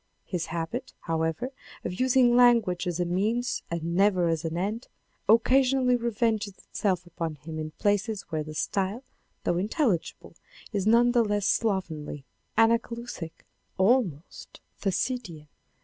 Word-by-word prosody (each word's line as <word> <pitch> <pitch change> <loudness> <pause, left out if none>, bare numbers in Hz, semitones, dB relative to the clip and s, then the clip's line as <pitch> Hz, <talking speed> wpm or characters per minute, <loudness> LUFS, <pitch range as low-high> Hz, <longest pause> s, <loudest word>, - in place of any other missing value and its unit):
His 180 -3 -3
habit, 170 +10 -4
however, 165 - -1 0.3
of 180 - -4
using 255 -1 +4
language 230 -8 +4
as 175 -1 -2
a 175 - +1
means 215 +8 0
and 170 0 -3
never 185 -3 +3
as 165 -1 -1
an 165 0 -3
end, 210 +6 -2 0.4
occasionally 255 +2 +4
revenges 220 -3 -1
itself 185 -4 -2
upon 165 -2 -4
him 155 +2 -7
in 155 0 -4
places 205 0 0
where 155 -1 -1
the 155 0 -9
style, 200 - -1 0.4
though 175 - +1
intelligible, 210 - -1 0.4
is 200 -1 0
none 235 +2 +5
the 240 -1 +4
less 205 -2 0
slovenly, 160 - -1 0.3
anacoluthic, 230 -6 0 0.3
almost 190 - 0 0.2
Thucydidean. 190 - -2
200 Hz, 130 wpm, -27 LUFS, 170-235 Hz, 0.4 s, none